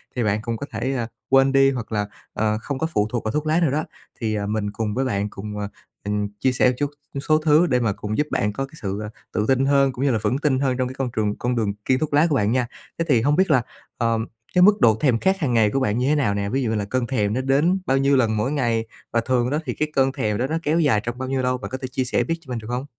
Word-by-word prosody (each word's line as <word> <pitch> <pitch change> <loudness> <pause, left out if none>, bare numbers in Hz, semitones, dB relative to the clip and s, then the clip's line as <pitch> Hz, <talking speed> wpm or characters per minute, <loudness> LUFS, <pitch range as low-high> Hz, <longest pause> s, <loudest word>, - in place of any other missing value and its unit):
thì 125 - 0
bạn 105 0 +1
cũng 115 0 -3
có 140 - -5
thể, 120 +5 -2
à, 120 -3 -2 0.2
quên 135 0 +5
đi 135 0 +5
hoặc 120 -4 -5
là, 105 -1 0 0.3
ờ, 110 0 0
không 140 +3 -4
có 160 - 0
phụ 105 0 +2
thuộc 120 - -2
vào 110 - -1
thuốc 150 +3 -1
lá 160 +3 +3
nữa 155 -6 +2
đó. 155 +2 0 0.4
Thì, 110 -2 -1
à, 100 -1 -2
mình 105 0 -2
cùng 105 -1 -3
với 135 +1 0
bạn 100 -4 -1
cùng, 105 +1 -7
à, 100 - -2 0.4
ừm, 105 - -2
mình 105 0 0
chia 130 - +2
sẻ 125 0 +3
một - - 0
chút 145 -1 -1 0.4
số 155 0 +5
thứ 155 +2 +4
để 125 -5 +2
mà 110 -4 +1
cùng 105 +1 -4
giúp 150 0 +1
bạn 105 0 0
có 135 +5 -2
cái 135 - -17
sự, 100 0 -3
ờ, 105 - -5 0.2
tự 105 - 0
tin 135 0 +3
hơn, 140 -1 +3
cũng 130 +2 -3
như 140 - +3
là 115 - +2
vững 130 - +1
tin 140 -3 +1
hơn 130 -2 0
trong 130 -1 0
cái 130 - -8
con 130 -2 -1
trường 105 -1 0
con 125 0 -1
đường 105 -3 0
kiêng 130 0 +2
thuốc 155 -2 -2
lá 150 +4 +5
của 150 - +1
bạn 105 -4 +2
nha. 125 0 +1 0.3
Thế 165 - +1
thì 125 -7 +4
hông 145 +4 +2
biết 190 +3 +2
là, 130 - +5 0.4
ờm, 115 -1 0 0.3
cái 180 - +5
mức 205 -1 +6
độ 110 -2 +5
thèm 125 -6 +3
khát 190 +6 +1
hàng 140 -6 0
ngày 110 -2 +4
của 135 - 0
bạn 110 -4 0
như 125 +2 +1
thế 150 - +3
nào 120 -9 +1
nè, 100 0 -2
ví 135 +4 0
dụ 115 - 0
như 110 - 0
là 105 -1 -1
cơn 120 +3 -1
thèm 105 -5 0
nó 130 - 0
đến 145 +8 +2
bao 135 -5 +2
nhiêu 140 +1 +3
lần 110 -4 +2
mỗi 115 +6 0
ngày 120 -6 0 0.3
và 115 - +3
thường 125 0 +1
đó 150 +2 0
thì - - -2
cái 155 0 -2
cơn 135 0 +3
thèm 110 -7 -1
đó 125 - 0
nó 160 +3 -1
kéo 155 +3 +2
dài 140 -10 +3
trong 120 +1 -4
bao 130 0 -4
nhiêu 135 -1 0
lâu, 125 0 0
bạn 125 - -7
có 130 - -3
thể 130 - -3
chia 130 +1 -2
sẻ 125 - +1
biết 165 - -1
cho 140 - -18
mình 120 - -2
được 110 - -10
hông? 125 +2 -2
125 Hz, 320 wpm, -23 LUFS, 110-140 Hz, 0.4 s, mức